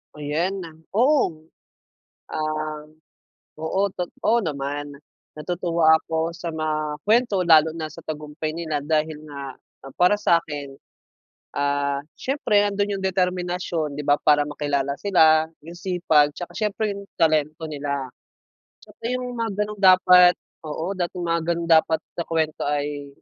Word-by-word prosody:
Ayan, 165 +6 -2 0.3
oo. 230 - +2 0.9
Ah, 155 -1 -3 0.8
oo 160 +4 -1 0.2
tot 180 -1 -4 0.2
oo 235 +1 +3
naman. 145 -2 -4 0.4
Natutuwa 165 0 +2
ako 160 +1 -2
sa 170 -1 -5
mga 155 -1 -2
kuwento 230 0 +3
lalo 160 -1 +6
na 160 -1 -5
sa 155 +2 -12
tagumpay 155 0 -5
nila 155 -3 -3
dahil 155 +1 0
nga 140 -3 -8 0.4
para 195 +4 +3
sa'kin, 145 -7 0 0.8
ah, 140 0 0 0.2
siyempre 215 -7 +1
nando'n 205 0 -1
yung 190 - -4
determinasyon 180 -4 -1
'di 145 - -4
ba, 145 0 +3
para 150 -1 +4
makilala 145 -1 -2
sila. 160 -5 +4 0.2
Yung 170 +3 -11
sipag 170 -5 +2
'tsaka 175 - -8
siyempre 210 -1 -1
yung 200 - -9
talento 155 0 +1
nila. 140 -3 -3 0.7
Kasi 235 +2 -5
yung 250 0 -4
mga 230 -2 -2
gano'n 210 0 -7
dapat, 180 -2 +7 0.3
oo, 160 +4 -3
dapat 185 -2 -3
mga 170 -2 0
ganon 170 0 -1
dapat 160 0 -1
sa 170 - -5
kwento 160 -3 -1
ay 145 0 -2
160 Hz, 130 wpm, -23 LUFS, 150-180 Hz, 0.9 s, dapat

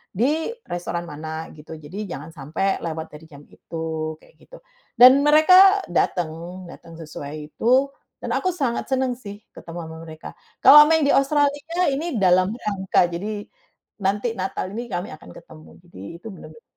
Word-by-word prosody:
di 305 - 0 0.2
restoran 175 0 -3
mana 160 0 -7
gitu 155 +1 -11
jadi 155 +4 -11 0.2
jangan 150 +4 -10
sampai 160 +6 -2
lewat 160 -1 -6
dari 150 +2 -13
jam 145 -2 -15
itu," 160 0 -6
kayak - - -24
gitu. - - -16 0.3
Dan 255 +3 +8
mereka 370 +6 +6
dateng 175 -1 0 0.4
dateng 165 0 -13
sesuai 150 -1 -9
itu, 260 +4 +2 0.3
dan - - -4
aku 370 -2 -2
sangat 265 -8 -2
seneng 260 -2 -1
sih 205 -4 -9 0.2
ketemu 170 +1 -10
ama 160 0 -9
mereka 155 0 -10 0.3
kalau 295 +2 +10
main 320 0 +3
di 285 - +3
Australia 290 +4 +1
ini 295 +2 -3
dalam 185 +3 +3
rangka 190 -6 0
jadi, 205 +4 -5 0.6
nanti 205 +4 -1
Natal 185 0 -4
ini 235 +4 -6
kami 180 +3 -4
akan 155 - -15
ketemu 155 -1 -15
jadi 175 - -14 0.2
itu 225 - -11
bener-bener 465 - -14
195 Hz, 155 wpm, -22 LUFS, -, 0.6 s, kalau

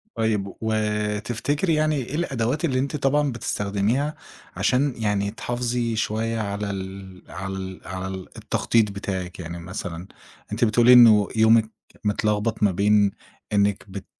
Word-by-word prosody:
طيّب، 105 -4 -1
و 110 0 0 0.5
تفتكري 145 - -1
يعني 155 0 +2
إيه 135 +1 -3
الأدوات 140 -1 -1
اللي 130 -4 0
أنتِ 140 +3 -2
طبعًا 145 0 +1
بتستخدميها 110 +6 -1 0.4
عشان 135 +1 +1
يعني 105 -2 0
تحافظي 120 0 -2
شوية 110 +1 -1
على 100 0 -3
ال 95 -1 -7
على 95 +1 -5
ال 95 -1 -7
على 95 +1 -4
ال 95 -1 -6
التخطيط 110 -3 +1
بتاعِك؟ 95 -3 -5
يعني 85 0 -6
مثلًا 90 0 -6 0.4
أنتِ 115 +3 +2
بتقولي 120 +3 +5
إنه 110 -5 +8
يومِك 110 0 +5 0.3
متلغبط 105 +1 0
ما 100 - +5
بين 100 +1 +3 0.4
إنِك 100 -1 +2
بت 95 0 -7
105 Hz, 140 wpm, -24 LUFS, 100-120 Hz, 0.5 s, إنه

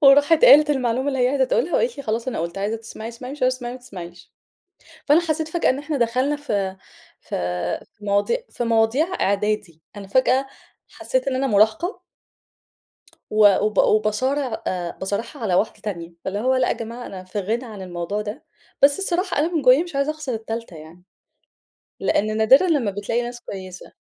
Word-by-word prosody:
وراحت 290 +3 +6
قالت 300 +1 +8
المعلومة 260 -1 0
اللي 270 -2 -1
هي 250 0 +3
عايزة 270 -1 +2
تقولها 310 +6 0
وقالت 475 0 +1
لي: 280 - -6
"خلاص، 230 +1 -2
أنا - - -3
قلت، 170 +3 -4
عايزة 205 +3 -1
تسمعي 225 0 -8
اسمعي، 250 +3 -8
مش 290 - -9
عايزه 255 0 +3
تسمعي 245 -1 -6
ما 255 - -8
تسمعيش." 175 -8 -11 0.7
فأنا 300 +3 +5
حسيت 315 -1 -1
فجأة 335 +1 +1
إن 260 - 0
إحنا 295 0 -3
دخلنا 255 +4 +1
في 200 -10 -2 0.4
في - - -28 0.6
في 205 - -15
مواضي 205 - +1
في - - -4
مواضيع 230 +6 +2
إعدادي، 200 -4 -1
أنا 200 -1 -8
فجأة 260 +4 +2 0.4
حسيت 260 -6 -2
إن 265 - 0
أنا 270 +1 0
مراهقة 220 - +2 1.3
و 210 -2 +6
وب 210 -2 -1
وباصارع 225 +4 +1
آآ، 175 -2 -2
باصارعها 205 +8 -4
على 195 -5 +1
واحدة 205 +5 0
تانية، 170 -5 -5
فاللي 195 +2 -2
هو 255 +4 +1
لأ 255 - +2
يا - - +2
جماعة 235 +2 -7
أنا 185 -1 -8
في 185 +3 -6
غنى 225 +6 -2
عن 215 -5 -9
الموضوع 180 +3 -4
ده، 210 +6 -7 0.4
بس 280 +3 +6
الصراحة 365 -2 -1
أنا 325 +4 0
من 315 - +1
جوايا 255 +4 +6
مش 345 -5 -8
عايزة 280 +2 +1
أخسر 305 -5 -4
التالتة 225 -4 -6
يعني، 160 +3 -14 1.0
لإن 215 +1 0
نادرًا 260 +11 +5
لما 280 - +1
بتلاقي 205 +4 -2
ناس 240 0 -6
كويسة. 185 -4 -9
235 Hz, 185 wpm, -22 LUFS, 205-275 Hz, 1.3 s, قالت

